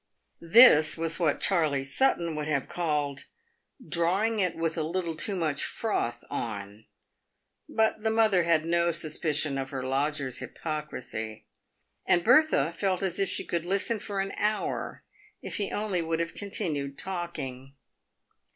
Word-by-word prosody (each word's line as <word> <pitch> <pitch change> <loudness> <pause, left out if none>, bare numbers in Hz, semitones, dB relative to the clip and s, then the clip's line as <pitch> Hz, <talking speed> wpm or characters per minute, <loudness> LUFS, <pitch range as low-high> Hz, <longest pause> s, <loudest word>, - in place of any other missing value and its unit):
This 165 -5 +7
was 165 +1 0
what 160 -4 +1
Charley 155 -8 +2
Sutton 170 - +1
would 150 0 -3
have 140 -3 -1
called 150 -5 -2 0.3
" - - -22
drawing 195 +7 +1
it 185 -3 +1
with 165 0 -1
a 165 - -1
little 170 +1 -2
too 195 +5 +1
much 155 -5 0
froth 120 - -2
on." 105 -1 -6 0.8
But 220 -1 +1
the 220 - +1
mother 220 -4 +3
had 165 -2 +2
no 170 +1 +2
suspicion 155 -3 -1
of 135 0 -4
her 135 -2 -4
lodger's 135 0 -1
hypocrisy, 130 -8 -6 0.6
and 175 - +2
Bertha 245 - +4
felt 190 0 -1
as 190 0 -1
if 195 -2 +1
she - - -2
could 170 -1 -2
listen 200 +5 0
for 200 -1 -4
an 195 0 -1
27S - - -7
PAVED - - -7
WITH 210 - +4
GOLD. 215 - -3
hour - - -6 0.4
if - - -6
he 205 -3 -2
only 205 -4 -1
would 165 0 -2
have 170 0 -2
continued 145 -8 -3
talking. 140 -8 -5
165 Hz, 160 wpm, -28 LUFS, 145-190 Hz, 0.8 s, This